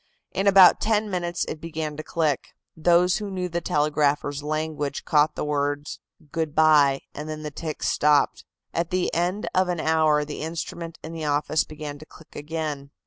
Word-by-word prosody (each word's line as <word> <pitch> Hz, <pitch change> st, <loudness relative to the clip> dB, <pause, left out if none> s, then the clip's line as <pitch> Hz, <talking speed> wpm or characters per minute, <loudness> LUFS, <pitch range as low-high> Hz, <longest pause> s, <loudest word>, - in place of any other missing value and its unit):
In 195 Hz, -, -1 dB
about 190 Hz, -2 st, +7 dB
ten 215 Hz, -1 st, +1 dB
minutes 175 Hz, -1 st, -2 dB
it 155 Hz, -, -6 dB
began 160 Hz, -2 st, -4 dB
to 155 Hz, -, -5 dB
click. 155 Hz, -3 st, -1 dB, 0.3 s
Those 175 Hz, +2 st, +3 dB
who 210 Hz, -1 st, -5 dB
knew 185 Hz, -2 st, -3 dB
the 170 Hz, 0 st, -3 dB
telegraphers' 145 Hz, -2 st, 0 dB
language 150 Hz, -1 st, -3 dB
caught 150 Hz, 0 st, +3 dB
the -, -, -3 dB
word 145 Hz, 0 st, -1 dB, 0.5 s
"Good 160 Hz, -3 st, -2 dB
bye," 150 Hz, -3 st, +5 dB
and 150 Hz, +1 st, -7 dB
then 155 Hz, 0 st, -5 dB
the 150 Hz, -, -5 dB
ticks 155 Hz, +1 st, -3 dB
stopped. 150 Hz, -1 st, +2 dB, 0.3 s
At 170 Hz, 0 st, -1 dB
the 185 Hz, 0 st, 0 dB
end 180 Hz, +5 st, -1 dB
of 185 Hz, 0 st, +2 dB
an 175 Hz, -2 st, -1 dB
hour 155 Hz, -2 st, +2 dB
the 145 Hz, -, -6 dB
instrument 165 Hz, +1 st, -5 dB
in 160 Hz, -, -7 dB
the 160 Hz, -2 st, -5 dB
office 150 Hz, +1 st, +1 dB
began 150 Hz, -1 st, -7 dB
to 155 Hz, -, -11 dB
click 160 Hz, -, -17 dB
again. 150 Hz, -2 st, -4 dB
155 Hz, 180 wpm, -24 LUFS, 150-170 Hz, 0.5 s, about